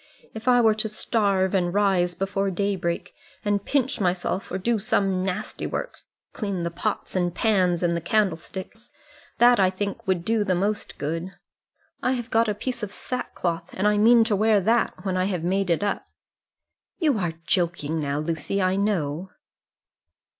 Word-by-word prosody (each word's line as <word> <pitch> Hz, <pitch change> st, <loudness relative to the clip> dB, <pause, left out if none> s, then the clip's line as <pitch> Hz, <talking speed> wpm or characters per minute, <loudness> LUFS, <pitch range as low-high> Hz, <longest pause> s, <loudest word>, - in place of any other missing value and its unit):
If 220 Hz, +1 st, -8 dB
I 245 Hz, -1 st, +6 dB
were 220 Hz, -2 st, +5 dB
to 215 Hz, +1 st, -2 dB
starve, 200 Hz, -3 st, +1 dB
and 175 Hz, -2 st, +1 dB
rise 185 Hz, -4 st, +2 dB
before 195 Hz, +2 st, -1 dB
daybreak, 180 Hz, -2 st, -2 dB, 0.3 s
and 205 Hz, -1 st, +1 dB
pinch 275 Hz, +1 st, 0 dB
myself, 185 Hz, +1 st, -1 dB
or 185 Hz, -, -1 dB
do 225 Hz, +4 st, 0 dB
some 190 Hz, -1 st, +1 dB
nasty 190 Hz, +3 st, -3 dB
work, -, -, -4 dB, 0.3 s
clean 200 Hz, -5 st, -3 dB
the 170 Hz, -, -2 dB
pots 195 Hz, +5 st, -3 dB
and 175 Hz, -1 st, 0 dB
pans 185 Hz, -6 st, +2 dB
and 170 Hz, -1 st, +2 dB
the 170 Hz, -, -2 dB
candlesticks; 195 Hz, +4 st, -2 dB, 0.5 s
that 240 Hz, 0 st, +6 dB
I 190 Hz, -1 st, +5 dB
think 200 Hz, +3 st, -4 dB
would 180 Hz, -2 st, 0 dB
do 225 Hz, -1 st, +2 dB
the 190 Hz, -3 st, +1 dB
most 205 Hz, +4 st, -2 dB
good. 165 Hz, +5 st, -4 dB, 0.7 s
I 255 Hz, -, +1 dB
have 240 Hz, -2 st, -4 dB
got 225 Hz, 0 st, +3 dB
a 210 Hz, -, -1 dB
piece 245 Hz, +3 st, -4 dB
of 210 Hz, -, -3 dB
sack 250 Hz, +4 st, -5 dB
cloth, 170 Hz, -1 st, -2 dB
and 195 Hz, +3 st, +1 dB
I 210 Hz, 0 st, +3 dB
mean 230 Hz, +2 st, +6 dB
to 220 Hz, -2 st, +1 dB
wear 215 Hz, +1 st, +4 dB
that, 225 Hz, +2 st, +1 dB
when 185 Hz, -1 st, 0 dB
I 185 Hz, -, +2 dB
have 180 Hz, -4 st, -2 dB
made 190 Hz, +2 st, 0 dB
it 170 Hz, +4 st, +2 dB
up." 205 Hz, -, -1 dB, 0.9 s
"You 295 Hz, -, +2 dB
are 175 Hz, -3 st, -1 dB
joking 170 Hz, -4 st, 0 dB
now, 140 Hz, -1 st, -1 dB
Lucy, 160 Hz, +5 st, -2 dB
I 185 Hz, 0 st, +2 dB
know." 185 Hz, -4 st, -1 dB
195 Hz, 175 wpm, -25 LUFS, 175-215 Hz, 0.9 s, I